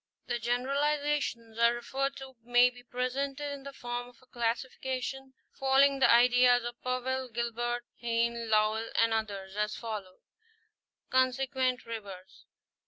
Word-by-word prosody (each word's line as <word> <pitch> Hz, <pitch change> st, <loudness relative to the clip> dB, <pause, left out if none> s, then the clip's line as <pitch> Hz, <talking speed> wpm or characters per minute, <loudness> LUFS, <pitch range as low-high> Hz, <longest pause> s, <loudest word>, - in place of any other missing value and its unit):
The 240 Hz, -1 st, -2 dB
generalizations 270 Hz, -1 st, -1 dB
here 235 Hz, +1 st, +5 dB
referred 270 Hz, +3 st, -2 dB
to 265 Hz, -1 st, -10 dB
may 245 Hz, +1 st, +4 dB
be 245 Hz, 0 st, -14 dB
presented 270 Hz, +4 st, -3 dB
in 280 Hz, -, -8 dB
the 280 Hz, +1 st, -8 dB
form 245 Hz, -2 st, -5 dB
of 245 Hz, -, -20 dB
a -, -, -20 dB
classification, 260 Hz, +2 st, -3 dB, 0.2 s
following 270 Hz, +1 st, +3 dB
the -, -, +6 dB
ideas 245 Hz, +1 st, +6 dB
of 240 Hz, 0 st, -6 dB
Powell, 255 Hz, +1 st, -2 dB
Gilbert, 240 Hz, +1 st, -2 dB, 0.2 s
Heim, 235 Hz, 0 st, +1 dB
Léwl 220 Hz, -1 st, +1 dB
and 230 Hz, 0 st, +3 dB
others, 200 Hz, -3 st, -3 dB
as 210 Hz, 0 st, -1 dB
follows: 210 Hz, -5 st, -6 dB, 0.9 s
Oonsequent 260 Hz, 0 st, +1 dB
rivers. 200 Hz, -5 st, -9 dB
245 Hz, 130 wpm, -30 LUFS, 230-265 Hz, 0.9 s, the